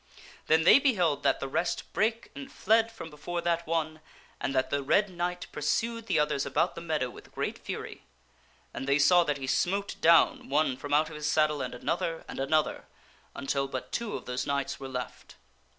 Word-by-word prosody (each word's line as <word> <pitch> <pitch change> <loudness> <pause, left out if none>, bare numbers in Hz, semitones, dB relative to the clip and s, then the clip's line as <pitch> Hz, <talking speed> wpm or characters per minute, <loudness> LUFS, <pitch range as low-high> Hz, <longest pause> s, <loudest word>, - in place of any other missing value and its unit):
Then 160 +1 +4
they 275 - +8
beheld 185 - +2
that - - +2
the 135 - -3
rest 170 +6 -2
brake 225 +1 0
and 275 0 -9
fled 225 +2 +2
from 165 -8 -9
before 165 +4 -5
that 170 -1 -1
one, 155 -1 -2 0.4
and 135 - -2
that 130 - +1
the 140 - +1
Red 195 +9 +2
Knight 180 0 -3
pur 150 - -7
sued 230 +9 -1
the - - +1
others 150 -2 +1
about - - 0
the - - -8
meadow 155 -6 -1
with - - -14
great - - -3
fury. - - -7 0.7
And 135 - -5
they 140 +1 +4
saw 175 +5 +5
that 145 -3 -1
he 135 - -5
smote 195 +9 0
down 165 -4 +4
one 145 -1 +2
from 145 +2 -8
out 150 +1 +3
his 150 -1 -3
saddle 150 -2 +2
and 125 -1 -4
another 165 +5 -2
and - - -7
another 150 +3 0 0.5
until 135 0 -1
but 130 -1 -6
two 235 -3 -3
of - - -7
those 125 0 -3
knights 140 -1 -2
were 135 -1 -7
left. 125 -2 -7
155 Hz, 200 wpm, -29 LUFS, 140-180 Hz, 0.7 s, they